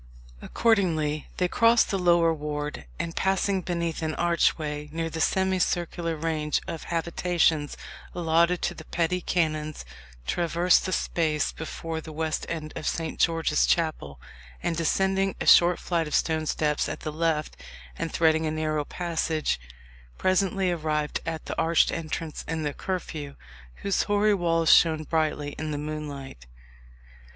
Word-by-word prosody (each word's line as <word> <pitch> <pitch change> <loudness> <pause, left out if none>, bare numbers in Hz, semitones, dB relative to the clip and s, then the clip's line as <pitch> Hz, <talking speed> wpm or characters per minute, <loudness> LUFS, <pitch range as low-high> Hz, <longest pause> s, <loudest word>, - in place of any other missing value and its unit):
Accordingly 160 -10 +1
they 180 - +2
crossed 230 +5 +4
the 195 - 0
lower 170 -2 +4
ward, 150 - -4
and 165 - -4
passing 190 0 +1
beneath 170 -2 -2
an 155 -1 -2
archway 155 -3 0
near 165 +1 -3
the 160 - -3
semicircular 175 -2 0
range 155 -1 -1
of 160 - -5
habitations 165 -2 0 0.4
allotted 170 +1 +2
to - - 0
the - - -11
petty 175 +2 0
canons, 155 - -1 0.4
traversed 170 - +2
the - - -2
space 155 -4 0
before 160 0 -5
the 160 - -9
west 155 0 -2
end 155 -2 -5
of - - -4
Saint 165 -1 -2
George's 165 -3 +2
Chapel, 155 - 0 0.4
and 165 - 0
descending 190 +4 +1
a - - -3
short 175 0 +7
flight 170 -3 -1
of 150 - -1
stone 160 -1 +1
steps 150 -1 0
at - - -5
the 155 - -4
left, 160 -1 0 0.4
and 165 - -3
threading 160 -1 +3
a - - 0
narrow 155 -1 -1
passage, 165 - -1 0.6
presently 185 - +1
arrived 155 -3 -1
at 160 -2 -4
the - - -4
arched 165 0 +3
entrance 160 -1 -4
in 160 0 -2
the 145 -1 -2
Curfew, 155 -6 -5 0.5
whose 200 - +1
hoary 205 0 +2
walls 165 -4 +3
shone 160 -2 +4
brightly 155 -2 -1
in 155 0 -3
the 150 - -2
moonlight. 145 - -6
165 Hz, 145 wpm, -26 LUFS, 155-175 Hz, 0.6 s, short